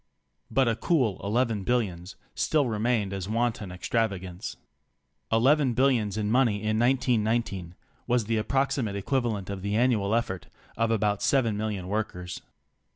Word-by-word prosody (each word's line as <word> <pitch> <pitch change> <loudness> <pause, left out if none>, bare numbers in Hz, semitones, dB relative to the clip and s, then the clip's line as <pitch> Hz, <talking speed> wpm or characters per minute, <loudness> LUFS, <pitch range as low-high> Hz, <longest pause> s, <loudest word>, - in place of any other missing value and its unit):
But 135 -2 +2
a 115 - +2
cool 125 - +1
eleven 110 0 0
billions 95 -6 -1 0.2
still 150 -3 +1
remained 110 -3 0
as 95 0 -4
wanton 110 -4 -1
extravagance. 95 -1 -2 0.7
Eleven 130 +3 +3
billions 120 -6 +2
in 105 -1 -1
money 120 -3 +3
in 110 +1 -1
1919 115 -7 +1 0.3
was 120 -2 +2
the 110 0 0
ap 105 - -4
proximate 135 -6 0
equivalent 105 -2 -1
of 95 -1 -5
the 100 +2 -1
annual 115 -4 +2
efifort 105 -5 -1 0.3
of 115 0 +1
about 105 -2 +1
seven 120 -6 +2
million 105 -3 -3
workers. 90 -4 -3
110 Hz, 140 wpm, -27 LUFS, 100-120 Hz, 0.7 s, Eleven